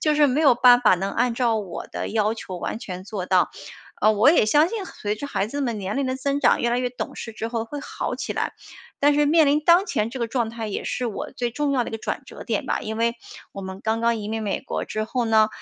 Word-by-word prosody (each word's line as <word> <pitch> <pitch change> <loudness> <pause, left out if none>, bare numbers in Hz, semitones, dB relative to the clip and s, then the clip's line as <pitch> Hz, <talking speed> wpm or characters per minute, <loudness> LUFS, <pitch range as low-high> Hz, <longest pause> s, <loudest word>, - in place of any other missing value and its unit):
就 305 -1 +2
是 295 0 +5
没 280 +3 +1
有 280 -5 +6
办 245 0 +6
法 245 - +5
能 190 +2 -2
按 245 -2 +1
照 235 -3 +1
我 195 -5 -5
的 - - -4
要 215 -1 +1
求 185 -5 -7
完 215 - -4
全 185 -4 -7
做 195 -3 -5
到。 185 -1 +3 0.5
呃 215 - +5
我 215 +7 +5
也 300 -10 +4
相 295 +9 +4
信 420 -2 -4
随 210 - -4
着 285 - -5
孩 210 -7 -1
子 285 +5 -4
们 240 -5 -1
年 195 +3 -3
龄 275 -1 0
的 260 - -1
增 280 +2 -1
长， - - +3
越 235 - +2
来 240 - +1
越 250 - 0
懂 245 - -6
事 225 - -6
之 220 +1 -4
后 230 -1 -2
会 290 +5 -6
好 - - -4
起 - - -4
来。 - - -2 0.5
但 290 +1 +4
是 295 0 +3
面 315 0 +5
临 290 +2 +3
当 350 +4 +5
前 215 - -1
这 260 - -6
个 235 - -1
状 235 -2 -1
态 225 -1 -5
也 200 - -3
是 250 - -2
我 285 +7 -5
最 245 -3 -2
重 295 +2 -1
要 250 -3 +1
的 - - -6
一 - - -13
个 225 - -3
转 - - -4
折 - - -10
点 - - -2
吧。 - - 0
因 220 +1 -5
为 230 +1 +1 0.4
我 195 - -7
们 190 0 -7
刚 220 +1 -1
刚 235 0 +2
移 205 - -5
民 220 0 -2
美 205 -2 -2
国 - - -4
之 215 0 -3
后 240 +2 -1
呢， 220 -1 +4
235 Hz, 305 characters per minute, -23 LUFS, 215-280 Hz, 0.5 s, 有